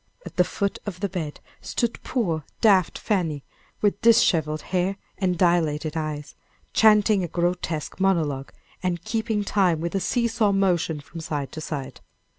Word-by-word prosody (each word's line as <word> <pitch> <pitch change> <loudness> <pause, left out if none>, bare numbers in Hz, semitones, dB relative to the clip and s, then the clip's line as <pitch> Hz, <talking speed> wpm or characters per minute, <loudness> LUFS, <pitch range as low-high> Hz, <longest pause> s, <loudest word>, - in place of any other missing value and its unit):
At - - -9
the 180 - +5
foot 200 +2 -2
of 185 -3 -5
the 200 - 0
bed 165 -5 -4 0.2
stood 235 -1 -2
poor 170 - -1 0.2
daft 195 -5 +4
Fanny, 165 -9 -1 0.4
with 205 -1 +1
disheveled 160 -9 +4
hair 185 +2 +1 0.2
and 185 -3 +1
dilated 160 -3 +1
eyes, 155 -2 -4 0.4
chanting 210 -2 +5
a - - -1
grotesque 170 -2 -2
monologue, 155 -8 +1 0.3
and 175 -2 -2
keeping 220 -2 -1
time 185 -5 +2
with 170 +1 -3
a 195 - +1
see 235 +4 +1
saw 225 -3 +2
motion 175 -6 +1
from 165 - -10
side 145 -4 -3
to 155 - -7
side. 135 -4 -5
180 Hz, 155 wpm, -24 LUFS, 155-200 Hz, 0.4 s, the